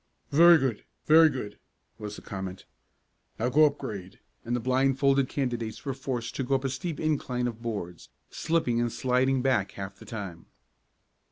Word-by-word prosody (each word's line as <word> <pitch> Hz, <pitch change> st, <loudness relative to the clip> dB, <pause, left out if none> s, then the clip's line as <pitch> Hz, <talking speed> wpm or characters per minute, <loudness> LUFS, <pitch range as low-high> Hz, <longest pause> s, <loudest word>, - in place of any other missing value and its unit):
"Very 170 Hz, +3 st, +8 dB
good! 130 Hz, -7 st, -1 dB, 0.2 s
Very 160 Hz, +1 st, +7 dB
good," 105 Hz, -7 st, -6 dB, 0.4 s
was 105 Hz, -1 st, -6 dB
the -, -, -12 dB
comment. 95 Hz, -1 st, -6 dB, 0.7 s
"Now 120 Hz, +3 st, 0 dB
go 150 Hz, +4 st, +6 dB
up 145 Hz, 0 st, -3 dB
grade," 100 Hz, -8 st, -7 dB, 0.2 s
and 120 Hz, +1 st, -2 dB
the -, -, 0 dB
blindfolded 135 Hz, +2 st, +2 dB
candidates 120 Hz, -5 st, -3 dB
were 135 Hz, -, -1 dB
forced 130 Hz, -3 st, -4 dB
to 135 Hz, -, -1 dB
go 135 Hz, +2 st, +1 dB
up 135 Hz, -, -1 dB
a -, -, +1 dB
steep 140 Hz, +4 st, -4 dB
incline 135 Hz, -5 st, -1 dB
of 115 Hz, -2 st, -4 dB
boards, 100 Hz, -7 st, -5 dB, 0.2 s
slipping 155 Hz, -8 st, 0 dB
and 120 Hz, -1 st, 0 dB
sliding 130 Hz, +1 st, +1 dB
back 120 Hz, -8 st, +1 dB
half 95 Hz, 0 st, -7 dB
the -, -, -12 dB
time. 95 Hz, -7 st, -7 dB
125 Hz, 170 wpm, -28 LUFS, 110-135 Hz, 0.7 s, Very